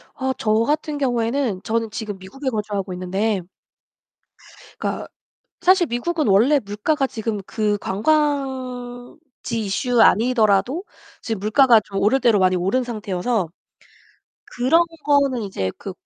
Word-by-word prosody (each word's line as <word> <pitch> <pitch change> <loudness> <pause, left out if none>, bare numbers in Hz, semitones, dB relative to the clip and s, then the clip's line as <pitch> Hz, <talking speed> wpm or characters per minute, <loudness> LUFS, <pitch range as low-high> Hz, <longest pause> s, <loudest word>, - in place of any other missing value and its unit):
아 265 -1 -1
저 215 - 0
같은 300 +1 -1
경우에는 240 -5 0
저는 225 0 -1
지금 215 -3 -5
미국에 260 +9 -5
거주하고 205 -4 -3
있는데 190 +3 -1 1.4
그러니까 - - -3 0.5
사실 370 -1 +4
미국은 305 +6 -1
원래 230 +10 +5
물가가 240 +7 -1
지금 220 -4 -4
그 210 -2 -1
관광지 255 +1 -2
이슈 225 +4 0
아니더라도 235 - +3 0.4
지금 225 -4 -4
물가가 230 +2 +5
좀 195 - -5
오를 220 +7 +3
대로 235 -5 +4
많이 185 -1 +3
오른 195 +9 0
상태여서 210 -3 -2 1.1
그런 260 +8 +4 0.2
거는 280 -4 +2
이제 145 - -3
그 - - -6
235 Hz, 275 characters per minute, -21 LUFS, 205-270 Hz, 1.4 s, 원래